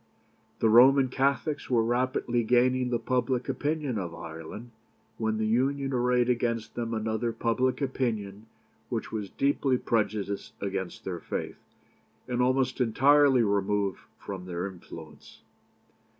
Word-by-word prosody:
The - - +4
Roman 130 +4 +6
Catholics 140 +3 0
were 120 -3 +3
rapidly 120 0 0
gaining 125 +2 +2
the 120 - +1
public 125 0 -1
opinion 145 -2 -1
of 85 -3 -5
Ireland, 80 +9 -8 0.5
when 110 -1 0
the 110 - 0
Union 135 +4 +1
arrayed 125 0 +2
against 115 -2 -1
them 115 -1 -3
another 110 +1 -1
public 120 +4 0
opinion 110 -6 -2 0.4
which - - -3
was 105 -3 -4
deeply 135 0 +1
prejudiced 105 -4 -2
against 95 -2 -4
their 90 -3 -4
faith, - - -5 0.7
and 125 -1 -1
almost 130 +1 +1
entirely 135 +2 +5
removed 100 -1 0 0.2
from 95 -2 -7
their 90 0 -3
influence. 85 -4 -11
120 Hz, 125 wpm, -28 LUFS, 105-130 Hz, 0.7 s, Roman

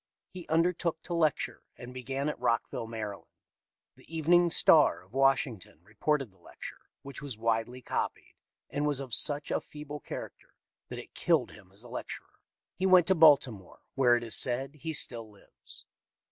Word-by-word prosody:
He 180 -2 -9
undertook 165 0 0
to 175 - -5
lecture, 160 -4 0 0.2
and 125 +1 -10
began 135 +3 -3
at 150 - -3
Rockville, 115 0 -1
Md. 110 -3 -6 0.7
The 165 - -9
Evening 175 +2 +4
Star, 160 - +4
of 95 - -27
Washington, 135 - +1
reported 120 +5 -1
the 95 - -26
lecture, - - -11
which 140 -2 -9
was 140 -6 -6
widely 115 +2 -1
copied, - - -3 0.3
and 145 +1 -2
was 145 -2 -1
of 130 -4 -7
such 145 +2 +1
a - - 0
feeble 150 0 -9
character - - -9 0.3
that - - -6
it - - -10
killed - - +1
him 95 -3 -16
as 100 +4 -10
a - - -12
lecturer. 120 - -8 0.3
He 190 - -1
went 185 -2 +6
to 190 - +3
Baltimore, 140 - +4
where, 125 -3 +4
it 120 - -2
is 115 -3 0
said, 130 +2 +3
he 160 +2 -6
still 115 -6 0
lives. 105 -2 -12
135 Hz, 170 wpm, -30 LUFS, 115-150 Hz, 0.7 s, went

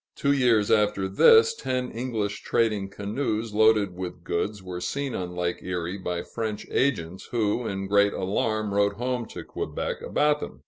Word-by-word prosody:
Two 140 - +1
years 120 -7 +3
after 105 -3 +2
this, 450 - +6
ten 130 - -3
English 110 -4 -3
trading 105 -4 0
canoes, 110 +2 -3
loaded 105 -3 +4
with 90 -1 -6
goods, 100 +4 -2
were 90 -1 -6
seen 140 +6 -2
on 90 -1 -4
Lake 90 0 -2
Erie 90 +1 -3
by 90 -1 -3
French 110 -2 -4
agents, 95 -10 0
who 115 0 0
in 95 0 -3
great 100 +1 +4
alarm 105 +2 -1
wrote 100 0 +2
home 125 +2 -2
to - - -8
Quebec - - -4
about 150 0 +1
them. - - -7
105 Hz, 165 wpm, -26 LUFS, 95-120 Hz, -, this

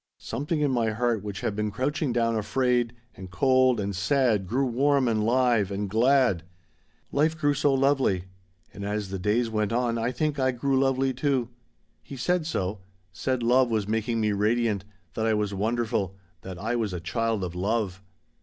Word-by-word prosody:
Something 150 +2 -3
in 145 -2 +2
my 115 -3 +1
heart 115 0 0
which 100 -2 -5
had 105 - -2
been 105 0 -1
crouching 135 +6 -1
down 115 -1 +1
afraid 120 +2 0 0.2
and 95 -1 -10
cold 130 +4 +3
and 100 -1 -2
sad 105 -1 +1
grew 130 +7 +1
warm 135 +2 +2
and 110 -2 +1
live 120 -3 +2
and 100 +1 -3
glad. 120 -2 +3 0.7
Life 155 +3 +1
grew 145 -1 +2
so 145 0 +2
lovely; 135 -9 +2 0.5
and 100 - -8
as 105 -1 -3
the 95 0 -4
days 105 +5 +1
went 105 -2 0
on 120 -1 0
I 115 +2 0
think 145 +3 -1
I 130 -1 +2
grew 135 +2 +1
lovely 135 0 +1
too. 130 -2 0 0.5
He 140 - -10
said 175 +4 0
so; 95 - -2 0.3
said 130 +4 -2
love 125 +1 +4
was 110 -3 -1
making 115 +1 -1
me 105 -1 +1
radiant 105 -1 +1 0.3
that 110 +3 -1
I 110 - +2
was 105 -1 -1
wonderful 105 -2 -1 0.3
that 95 -1 -8
I 115 +6 -2
was 110 -5 -1
a 90 - -3
child 115 +3 -1
of 90 -2 -4
love. 95 0 -1
115 Hz, 180 wpm, -26 LUFS, 105-130 Hz, 0.7 s, love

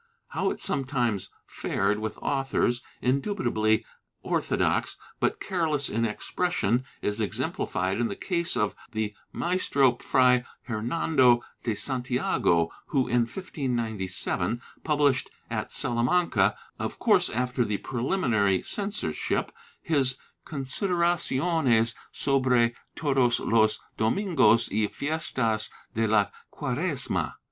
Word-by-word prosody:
How - - 0
it - - -4
sometimes 120 -8 0 0.2
fared 105 +1 -1
with 110 0 -4
authors, 135 -3 0 0.2
indubitably 125 - +1 0.4
orthodox - - 0 0.2
but - - 0
careless 160 -6 0
in 115 +2 0
expression, 125 - 0 0.2
is 105 +2 0
exemplified 95 -1 -1
in 120 - +2
the - - -4
case 170 -2 -1
of 105 - +1 0.2
the 110 -1 -2 0.2
Maestro 145 -7 +2
Fray 125 -1 +3 0.2
Hernando 120 +1 +2 0.2
de 115 -3 -1
Santiago 125 - +1 0.2
who, 135 -3 +1
in 120 0 +2
1597, 115 - -2 0.2
published 145 -4 +2 0.2
at - - -3
Salamanca, 125 +9 +2 0.2
of - - -3
course - - +3
after 125 +1 0
the 105 -2 -1
preliminary 115 - +1
censorship, 205 0 -2 0.3
his 135 -6 +2 0.3
Consider 170 +6 -1
aciones 140 -8 +2 0.2
sobre 130 -4 +2 0.2
todos 135 -5 +2
los 110 -1 +3 0.2
Domingos 115 - +3
y 105 +1 +1
Fiestas 125 -8 0 0.2
de 110 0 +1
la 105 -1 +4 0.3
Quaresma. - - -2
125 Hz, 105 wpm, -27 LUFS, 110-145 Hz, 0.4 s, la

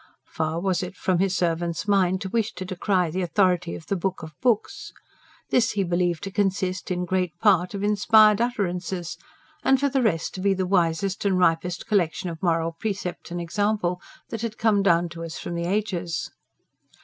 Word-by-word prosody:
Far 160 +1 -2
was 185 0 0
it 185 +1 -6
from 185 -3 +1
His 190 -1 +1
servant's 170 +2 -1
mind 190 -2 +2
to 190 - -4
wish 225 +1 0
to 185 - -6
decry 185 -2 0
the 185 +3 -2
authority 180 -1 +1
of 160 - -10
the 200 - -1
Book 190 0 -3
of 155 -1 -8
Books. 240 -4 0 0.6
This 235 -2 +3
he 200 -2 +1
believed 175 -2 0
to 195 - -4
consist, 190 -2 -1
in 180 -1 -1
great 180 -1 -1
part, 190 -2 +3
of 200 - -4
inspired 210 +1 +5
utterances, 185 -6 -2 0.5
and, 270 -1 +4
for 280 +1 +2
the 270 0 +1
rest, 185 -9 0
to 185 - -6
be 195 0 +2
the 190 0 -1
wisest 180 +1 +1
and 195 -2 +2
ripest 175 0 +1
collection 185 -2 0
of 160 - -9
moral 165 -2 +1
precept 185 0 -5
and 175 0 -4
example 180 0 -1 0.3
that 225 - -5
had 230 -2 -4
come 215 -3 +3
down 175 -3 +3
to 165 0 -8
us 165 -1 -6
from - - -5
the 170 0 -2
ages. 180 -3 -2
185 Hz, 190 wpm, -25 LUFS, 175-200 Hz, 0.6 s, inspired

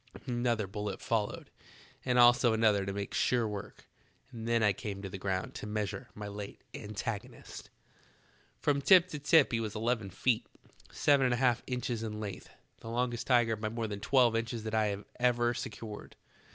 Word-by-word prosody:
Another 120 -3 0
bullet 105 +1 -5
followed, 110 -3 -2 0.5
and 125 -1 +1
also 120 -1 +6
another 105 -3 +3
to - - -1
make 100 0 -5
sure 120 -3 +2
work, 105 -2 -7 0.5
and 115 -2 -7
then 115 -1 +2
I 105 -2 +4
came 100 -1 -6
to 95 - -4
the 95 - -7
ground 95 -1 -2
to - - -7
meas 105 -2 -2
ure 100 - -8
my 105 0 -6
late 100 0 -8
antagonist. 110 +3 -6 0.9
"From 140 -1 +1
tip 185 +3 +6
to 150 -4 -5
tip 150 +1 +5
he 115 - +1
was 110 -2 -4
eleven 110 -2 -1
feet, 110 +5 0 0.4
seven 140 -2 +3
and 125 -1 +2
a - - -3
half 120 -1 +2
inches 125 -2 -2
in 105 -1 -4
length, 100 -3 -6 0.3
the 115 - -9
longest 120 0 -1
tiger 120 -3 +4
by 110 0 -3
more 115 +1 -3
than 105 -2 -4
twelve 120 +2 +3
inches 115 0 -2
that 110 0 -5
I 105 -2 +1 0.2
ever 120 -1 +2
secured. 110 -3 -7
115 Hz, 180 wpm, -31 LUFS, 105-120 Hz, 0.9 s, also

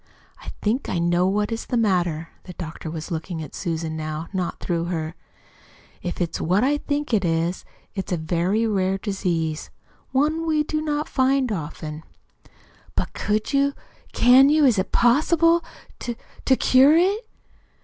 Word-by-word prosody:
"I - - -8
think 230 +6 0
I - - -1
know 175 +1 +2
what 205 +3 0
is 225 - -4
the 245 - 0
matter." 175 -7 +1 0.2
The 180 - -9
doctor 165 -1 -7
was 160 +3 -6
looking 165 +1 -4
at 150 - -10
Susan, 165 -3 -3
now, 155 +1 -4
not 185 -2 -2
through 170 -2 -1
her. 160 -2 -3 0.9
"If 175 - -4
it's 170 -2 -2
what 185 +7 +2
I 290 +3 +2
think 290 -3 -2
it 205 -3 +3
is, 165 +1 -1 0.3
it's 195 -2 -5
a 180 - +1
very 175 +7 0
rare 195 -3 +1
disease, 175 -6 -2 0.4
one 310 +5 +1
we 305 -1 +2
do 310 0 -2
not 300 -1 -1
often 265 -1 +1 0.4
find." 155 +1 -6 0.9
"But - - -2
could 215 +5 -1
you 280 0 +3 0.4
can 255 +3 +6
you 305 0 +4
is 235 -7 +4
it 190 - -2
possible 330 +7 +4 0.4
to 240 -1 -4 0.3
to 265 - +5
cure 270 +5 +5
it?" 395 +6 +2
200 Hz, 160 wpm, -23 LUFS, 170-275 Hz, 0.9 s, can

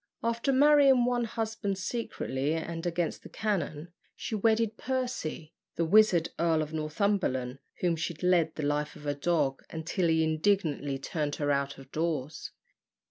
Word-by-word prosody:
After 235 +4 0
marrying 275 -2 +6
one 245 -1 +1
husband 220 -3 -3
secretly 175 - -2
and 165 +1 -4
against 170 -1 -2
the - - -12
canon, 170 -6 -2 0.3
she - - -6
wedded 220 +1 +2
Percy, 245 -13 -3 0.2
the 170 - +1
wizard 180 -2 +5
Earl 165 -2 +2
of 155 +1 -8
Northumberland, 155 -5 -1 0.2
whom 175 -2 +2
she 165 +1 -3
led 175 -1 +2
the 155 - -4
life 150 +1 -1
of 150 - -12
a 145 - 0
dog, 140 -2 0
until 165 +2 -1
he 160 0 +3
indignantly 155 -4 +1
turned 145 +1 -3
her 145 -1 0
out 140 0 -1
of 135 0 -14
doors. 155 -3 -2
165 Hz, 150 wpm, -29 LUFS, 150-215 Hz, 0.3 s, marrying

